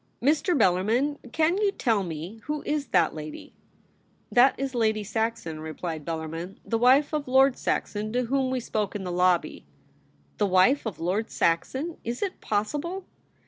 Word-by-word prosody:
' - - -42
Mr. 315 +2 +2
Bellarmin, 225 +9 +2
can 320 +4 +2
you 415 -2 +2
tell 225 - +1
me 170 +4 -6
— - - -30
who 300 0 -3
is 295 -1 -1
that 175 -4 +2
lady 155 -1 -8 0.3
?' - - -37
* - - -39
That 250 +2 +5
is 270 -1 -2
Lady 220 -3 +1
Saxon,' 220 -6 -2
replied 160 0 -5
Bellarmin, 165 +3 -5
* - - -36
the 225 - 0
wife 270 +5 +4
of 300 -2 -1
Lord 265 0 +5
Saxon, 210 +1 -2
to 250 +1 +1
whom 265 +1 0
we 260 0 -1
spoke 215 -4 -2
in 200 - -3
the 180 - -4
lobby.' 180 0 +1 0.4
' - - -36
The 205 - +3
wife 195 +9 +4
of 195 -9 -6
Lord 190 +7 -1
Saxon! 265 - 0
Is 235 - -3
it 390 - -4
possible 295 - -2
225 Hz, 185 wpm, -26 LUFS, 180-275 Hz, 0.4 s, That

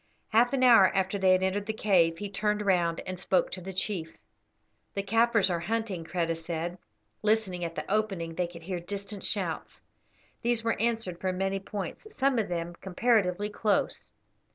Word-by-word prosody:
Half 235 +2 +4
an 260 -1 +2
hour 230 -6 +8
after 190 +1 0
they 190 -1 +4
had 185 0 +4
entered 200 +2 -1
the 220 - -1
cave 180 -6 +3
he 205 - -4
turned 210 +1 -1
round 175 -4 +2
and 185 -1 -6
spoke 185 -1 +1
to 185 - -5
the 190 +2 -6
chief. 185 -3 -3 0.8
"The 200 - -1
Kaffirs 225 -1 +3
are 170 - 0
hunting," 200 -1 -2
Kreta 165 -1 -1
said. 170 +2 -4 0.4
Listening 210 -5 +1
at 165 -1 -4
the - - -4
opening 195 -6 -1
they 180 +1 -1
could 170 -1 -12
hear 180 0 -3
distant 200 +3 -5
shouts. - - -2 0.6
These 235 -1 +1
were 230 - 0
answered 225 -7 -1
from 185 -1 -1
many 195 +1 0
points, 195 - -6
some 270 -3 +2
of 215 - 0
them 170 -1 -3
comparatively 205 -1 +1
close. 205 - 0
195 Hz, 175 wpm, -29 LUFS, 175-215 Hz, 0.8 s, hour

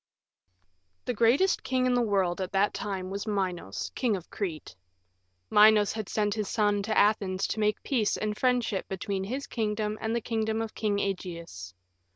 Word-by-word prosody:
II - - -47
The 250 - -1
greatest 245 - +3
king 255 -1 0
in 250 - +2
the 245 - +3
world 195 -5 +1
at 185 - -4
that 195 +1 +2
time 190 -2 -4
was 200 +2 -4
Minos, 185 - -2
King 240 -5 +1
of 180 -3 -9
Crete. 175 -7 -5 0.8
Minos 210 -1 +6
had 215 -3 -5
sent 210 -1 0
his 215 -2 -3
son 205 -2 +1
to 215 +2 -1
Athens 195 -3 +2
to - - -3
make 210 0 0
peace 230 -7 +1
and 210 0 -2
friendship 245 -5 0
between 190 0 -3
his 265 +7 -4
kingdom 215 -2 -2
and 225 +1 -1
the - - +1
kingdom 220 -1 -1
of 225 -1 -4
King 210 -2 0
Ægeus. 170 - -5
210 Hz, 180 wpm, -28 LUFS, 195-220 Hz, 0.8 s, Minos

